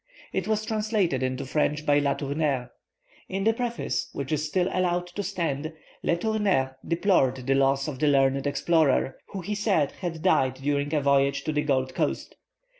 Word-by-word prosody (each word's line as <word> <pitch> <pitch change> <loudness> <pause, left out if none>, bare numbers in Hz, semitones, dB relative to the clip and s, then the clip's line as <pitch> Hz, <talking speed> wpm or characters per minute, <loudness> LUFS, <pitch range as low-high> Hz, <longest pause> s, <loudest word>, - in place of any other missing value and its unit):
It 190 0 -1
was 215 0 0
translated 210 - 0
into 130 +1 -2
French 150 +2 0
by 145 0 +4
Le 140 -1 +1
Tourneur. 140 -3 -1 0.6
In 195 +1 -2
his 225 - +4
preface, 235 0 -2
which 140 0 -5
is 155 -1 0
still 175 +4 0
allowed 180 -1 0
to 190 +3 -4
stand, 160 -6 -2 0.3
Le 170 - +1
Tourneur 190 -10 0
deplored 170 -7 +2
the 135 - +2
loss 135 +1 +2
of 140 -4 -5
the 150 - +2
learned 135 0 +3
explorer, 145 -2 +2
who 195 - -6
he 205 +5 -3
said 200 -9 +1
had 165 -4 -6
died 130 -1 +3
during 145 +1 -1
a 150 - +2
voyage 140 0 +2
to 155 - -1
the 150 -1 +1
Gold 130 -3 0
Coast. - - -2
150 Hz, 180 wpm, -26 LUFS, 135-185 Hz, 0.6 s, by